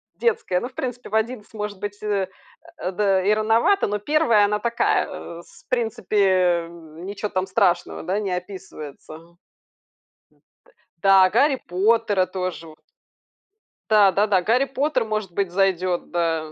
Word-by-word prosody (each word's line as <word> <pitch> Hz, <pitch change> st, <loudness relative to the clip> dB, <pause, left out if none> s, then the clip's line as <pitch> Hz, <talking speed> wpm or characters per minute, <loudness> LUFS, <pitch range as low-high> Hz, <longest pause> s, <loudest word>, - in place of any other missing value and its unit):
детская. 190 Hz, -, 0 dB
Ну, 240 Hz, -, -4 dB
в -, -, -25 dB
принципе, 250 Hz, -1 st, -5 dB
в 215 Hz, -, -3 dB
11 220 Hz, -1 st, -2 dB
может 210 Hz, -2 st, -5 dB
быть, 205 Hz, +1 st, -6 dB
э, 200 Hz, -3 st, 0 dB, 0.5 s
а, 185 Hz, -, -3 dB
да, 195 Hz, -1 st, +1 dB
и 205 Hz, +3 st, +3 dB
рановато, 225 Hz, -, +2 dB
но 210 Hz, 0 st, -2 dB
1 235 Hz, -4 st, +3 dB
она 210 Hz, +1 st, 0 dB
такая, 235 Hz, +2 st, +1 dB
э, 170 Hz, 0 st, -8 dB
с -, -, -20 dB
в -, -, -45 dB
принципе, 220 Hz, -4 st, 0 dB, 0.4 s
м, 165 Hz, 0 st, -12 dB
ничего 205 Hz, +1 st, -4 dB
там 190 Hz, -1 st, -2 dB
страшного, 190 Hz, -2 st, 0 dB
да, 185 Hz, +5 st, -1 dB
не 200 Hz, -3 st, -3 dB
описывается. 180 Hz, -6 st, -8 dB
Н 165 Hz, +2 st, -16 dB
т -, -, -40 dB, 1.7 s
Да, 195 Hz, -1 st, +6 dB
"Гарри 275 Hz, +2 st, +2 dB
Поттера" 205 Hz, +1 st, +2 dB
тоже 185 Hz, -3 st, -5 dB
во 155 Hz, -, -13 dB, 1.2 s
Да, 210 Hz, -3 st, +6 dB
да-да, 200 Hz, -1 st, +2 dB
"Гарри 235 Hz, +8 st, +2 dB
Поттер", 275 Hz, +2 st, 0 dB
может 215 Hz, -3 st, -3 dB
быть, 190 Hz, 0 st, -2 dB
зайдет, 185 Hz, -1 st, 0 dB
да. 165 Hz, -2 st, -1 dB
200 Hz, 155 wpm, -22 LUFS, 180-220 Hz, 1.7 s, Да